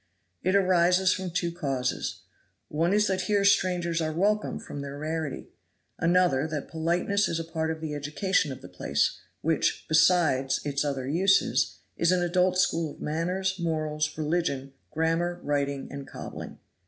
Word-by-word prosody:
It 185 Hz, +2 st, +1 dB
arises 185 Hz, -1 st, +4 dB
from 185 Hz, -1 st, -4 dB
two 170 Hz, 0 st, -1 dB
causes. 135 Hz, -7 st, -2 dB, 0.5 s
One 165 Hz, +4 st, +1 dB
is 210 Hz, +1 st, +3 dB
that 190 Hz, -2 st, 0 dB
here 200 Hz, -1 st, +3 dB
strangers 180 Hz, -4 st, +2 dB
are 155 Hz, 0 st, -1 dB
welcome 205 Hz, +6 st, +1 dB
from 145 Hz, -, -7 dB
their 140 Hz, 0 st, -6 dB
rarity; 155 Hz, -1 st, -4 dB, 0.5 s
another, 170 Hz, -5 st, +3 dB
that 155 Hz, -2 st, -5 dB
politeness 175 Hz, +5 st, +1 dB
is 165 Hz, -, -2 dB
a -, -, -2 dB
part 160 Hz, -1 st, -2 dB
of 160 Hz, 0 st, -4 dB
the 155 Hz, -2 st, -4 dB
education 150 Hz, +3 st, 0 dB
of 130 Hz, -, -8 dB
the -, -, -8 dB
place, 75 Hz, -5 st, 0 dB, 0.2 s
which, -, -, 0 dB
besides 155 Hz, -5 st, +3 dB
its 140 Hz, 0 st, 0 dB
other 135 Hz, -3 st, -2 dB
uses, 190 Hz, +6 st, +2 dB, 0.2 s
is 170 Hz, +1 st, +3 dB
an 180 Hz, -1 st, +2 dB
adult 180 Hz, +1 st, +2 dB
school 165 Hz, -3 st, +2 dB
of -, -, -21 dB
manners, 185 Hz, +5 st, -1 dB
morals, 155 Hz, -3 st, -1 dB
religion, 150 Hz, -4 st, -1 dB, 0.2 s
grammar, 165 Hz, +2 st, 0 dB
writing 140 Hz, -1 st, -1 dB
and 140 Hz, -1 st, -7 dB
cobbling. -, -, -8 dB
165 Hz, 155 wpm, -27 LUFS, 145-180 Hz, 0.5 s, arises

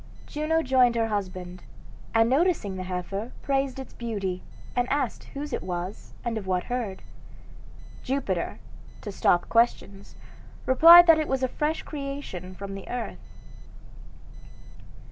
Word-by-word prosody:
Juno 320 Hz, +2 st, 0 dB
joined 255 Hz, -3 st, +4 dB
her 225 Hz, -1 st, +1 dB
husband, 185 Hz, -3 st, -4 dB, 0.5 s
and 225 Hz, 0 st, +5 dB
noticing 270 Hz, -, +1 dB
the 185 Hz, -, -5 dB
heifer 190 Hz, +5 st, -4 dB
praised 270 Hz, -1 st, 0 dB
its 265 Hz, -2 st, -8 dB
beauty, 200 Hz, -6 st, -3 dB, 0.3 s
and 245 Hz, 0 st, 0 dB
asked 280 Hz, -4 st, -1 dB
whose 290 Hz, -1 st, -5 dB
it -, -, -2 dB
was, 180 Hz, +2 st, -6 dB
and 230 Hz, -2 st, -1 dB
of 195 Hz, -, -10 dB
what 180 Hz, -1 st, 0 dB
herd. 235 Hz, -6 st, -4 dB, 1.0 s
Jupiter, 275 Hz, +2 st, -2 dB, 0.4 s
to 205 Hz, -, -6 dB
stop 175 Hz, -2 st, +2 dB
questions, 215 Hz, -4 st, 0 dB, 0.5 s
replied 335 Hz, +7 st, +9 dB
that 330 Hz, -2 st, +6 dB
it 310 Hz, -, -1 dB
was 265 Hz, -1 st, -1 dB
a -, -, +3 dB
fresh 300 Hz, +5 st, -2 dB
creation 275 Hz, -, -6 dB
from 195 Hz, +1 st, -7 dB
the 195 Hz, -1 st, -8 dB
earth. 235 Hz, -, -4 dB
235 Hz, 135 wpm, -26 LUFS, 190-275 Hz, 1.0 s, replied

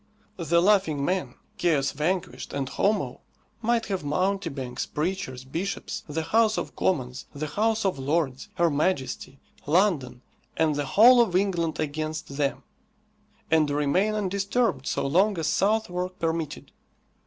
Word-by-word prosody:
The 170 Hz, -1 st, +2 dB
Laughing 180 Hz, -8 st, +3 dB
Man, 180 Hz, -9 st, -1 dB, 0.2 s
"Chaos 150 Hz, -6 st, +2 dB
Vanquished," 170 Hz, +5 st, -2 dB
and 140 Hz, -2 st, -2 dB
Homo 210 Hz, +9 st, 0 dB, 0.4 s
might 230 Hz, 0 st, +1 dB
have 190 Hz, -5 st, -3 dB
mountebanks, 150 Hz, -6 st, -2 dB
preachers, 150 Hz, -6 st, -3 dB
bishops, 170 Hz, +9 st, -4 dB
the 160 Hz, +2 st, -2 dB
House 220 Hz, +4 st, +3 dB
of -, -, -4 dB
Commons, 130 Hz, -8 st, -1 dB
the 150 Hz, +2 st, -3 dB
House 220 Hz, +6 st, 0 dB
of 185 Hz, -8 st, 0 dB
Lords, 135 Hz, -1 st, -1 dB
her 170 Hz, -1 st, +2 dB
Majesty, 140 Hz, -3 st, -1 dB, 0.3 s
London, 150 Hz, -8 st, +1 dB, 0.3 s
and 160 Hz, -2 st, +2 dB
the 145 Hz, 0 st, -1 dB
whole 240 Hz, +3 st, +9 dB
of 215 Hz, -7 st, +1 dB
England 175 Hz, -4 st, 0 dB
against 155 Hz, -1 st, -3 dB
them, 140 Hz, -2 st, -1 dB, 0.9 s
and 155 Hz, -2 st, +4 dB
remain 150 Hz, +9 st, +1 dB
undisturbed 200 Hz, -, 0 dB
so -, -, -1 dB
long 190 Hz, +8 st, +3 dB
as 165 Hz, -, -2 dB
Southwark 185 Hz, -2 st, 0 dB
permitted. 160 Hz, -2 st, -3 dB
165 Hz, 130 wpm, -26 LUFS, 145-195 Hz, 0.9 s, whole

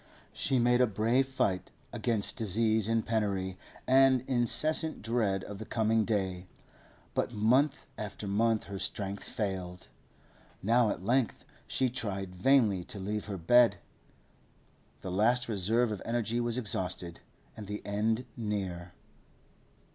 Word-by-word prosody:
She 135 Hz, -2 st, +1 dB
made 120 Hz, +1 st, +3 dB
a 125 Hz, -, +5 dB
brave 115 Hz, +6 st, +1 dB
fight 100 Hz, -8 st, -1 dB, 0.2 s
against 110 Hz, -4 st, 0 dB
disease 110 Hz, 0 st, +1 dB
and 115 Hz, 0 st, +1 dB
penury 100 Hz, -4 st, -1 dB, 0.3 s
and 130 Hz, -1 st, +5 dB
incessant 135 Hz, +5 st, +1 dB
dread 110 Hz, -4 st, 0 dB
of 100 Hz, -1 st, -8 dB
the 110 Hz, -, -6 dB
coming 110 Hz, -1 st, +1 dB
day, 95 Hz, -4 st, -1 dB, 0.7 s
but -, -, -1 dB
month 130 Hz, +7 st, +2 dB
after 105 Hz, 0 st, -6 dB
month 110 Hz, +2 st, +1 dB
her 100 Hz, -1 st, -7 dB
strength 100 Hz, +1 st, -3 dB
failed. 95 Hz, -5 st, -5 dB, 0.7 s
Now 115 Hz, +2 st, +3 dB
at 95 Hz, -, -4 dB
length 125 Hz, +1 st, 0 dB, 0.2 s
she 130 Hz, -, +1 dB
tried 95 Hz, -6 st, -4 dB
vainly 105 Hz, -3 st, +3 dB
to -, -, -6 dB
leave 105 Hz, +2 st, -3 dB
her 100 Hz, -2 st, -5 dB
bed. 120 Hz, +8 st, +5 dB, 1.2 s
The 95 Hz, -, -5 dB
last 120 Hz, +6 st, +2 dB
reserve 110 Hz, +3 st, +1 dB
of 105 Hz, -, -4 dB
energy 115 Hz, 0 st, -1 dB
was 120 Hz, 0 st, 0 dB
exhausted, 90 Hz, -6 st, -2 dB, 0.4 s
and 105 Hz, -2 st, -8 dB
the 105 Hz, +1 st, -5 dB
end 110 Hz, +4 st, 0 dB
near. 95 Hz, -6 st, -4 dB
110 Hz, 130 wpm, -30 LUFS, 100-120 Hz, 1.2 s, a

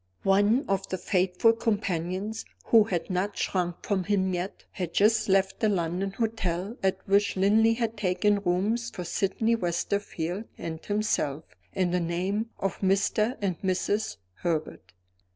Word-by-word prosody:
One 205 Hz, +8 st, +3 dB
of 195 Hz, 0 st, -1 dB
the 185 Hz, -, -2 dB
faithful 185 Hz, +4 st, +2 dB
companions, 205 Hz, -2 st, -2 dB, 0.2 s
who 225 Hz, -2 st, +6 dB
had 180 Hz, -1 st, -2 dB
not 190 Hz, +3 st, -1 dB
shrunk 175 Hz, -2 st, -2 dB
from 190 Hz, -3 st, 0 dB
him 190 Hz, -2 st, +1 dB
yet, 180 Hz, +2 st, -4 dB
had 180 Hz, -4 st, -5 dB
just 220 Hz, +1 st, +3 dB
left 195 Hz, 0 st, +2 dB
the 215 Hz, -, +2 dB
London 185 Hz, +1 st, -1 dB
hotel 205 Hz, -2 st, -2 dB
at 190 Hz, -1 st, +1 dB
which 200 Hz, +1 st, +2 dB
Linley 220 Hz, +4 st, +4 dB
had 230 Hz, -1 st, -2 dB
taken 200 Hz, +1 st, +2 dB
rooms 205 Hz, +6 st, 0 dB
for 180 Hz, -, -6 dB
Sydney 205 Hz, +6 st, 0 dB
Westerfield 180 Hz, -1 st, -2 dB
and 160 Hz, -1 st, -6 dB
himself 185 Hz, -8 st, -1 dB, 0.3 s
in 185 Hz, -2 st, +1 dB
the 180 Hz, -, +1 dB
name 185 Hz, +6 st, -1 dB
of 195 Hz, -, -2 dB
Mr. 200 Hz, +4 st, +1 dB
and 185 Hz, -5 st, -1 dB
Mrs. 200 Hz, +3 st, -1 dB, 0.2 s
Herbert. 165 Hz, -3 st, -3 dB
195 Hz, 145 wpm, -27 LUFS, 180-215 Hz, 0.3 s, who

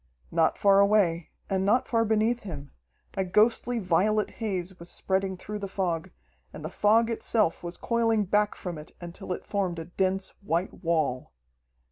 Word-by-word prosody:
Not 165 Hz, -1 st, +2 dB
far 200 Hz, -1 st, +5 dB
away, 200 Hz, -5 st, +3 dB, 0.2 s
and 190 Hz, -1 st, 0 dB
not 220 Hz, +6 st, +2 dB
far 230 Hz, -1 st, +2 dB
beneath 220 Hz, +2 st, +1 dB
him, 150 Hz, -8 st, -8 dB, 0.4 s
a 195 Hz, -, 0 dB
ghostly 220 Hz, +6 st, +2 dB
violet 210 Hz, +2 st, +1 dB
haze 190 Hz, -4 st, -3 dB
was 170 Hz, +1 st, -9 dB
spreading 190 Hz, 0 st, -1 dB
through 210 Hz, +3 st, -6 dB
the 200 Hz, -, -4 dB
fog, 180 Hz, -4 st, -2 dB, 0.4 s
and 155 Hz, -, -9 dB
the 155 Hz, -, -5 dB
fog 225 Hz, +4 st, +3 dB
itself 215 Hz, -5 st, +1 dB
was 175 Hz, 0 st, -6 dB
coiling 225 Hz, -2 st, +1 dB
back 210 Hz, +2 st, +1 dB
from 175 Hz, -4 st, -6 dB
it 150 Hz, -, -12 dB
until 175 Hz, +2 st, -8 dB
it 180 Hz, -, -4 dB
formed 190 Hz, -4 st, -1 dB
a 165 Hz, -, -5 dB
dense 190 Hz, +2 st, -1 dB
white 180 Hz, 0 st, -2 dB
wall. 155 Hz, -, 0 dB
195 Hz, 165 wpm, -27 LUFS, 175-210 Hz, 0.4 s, far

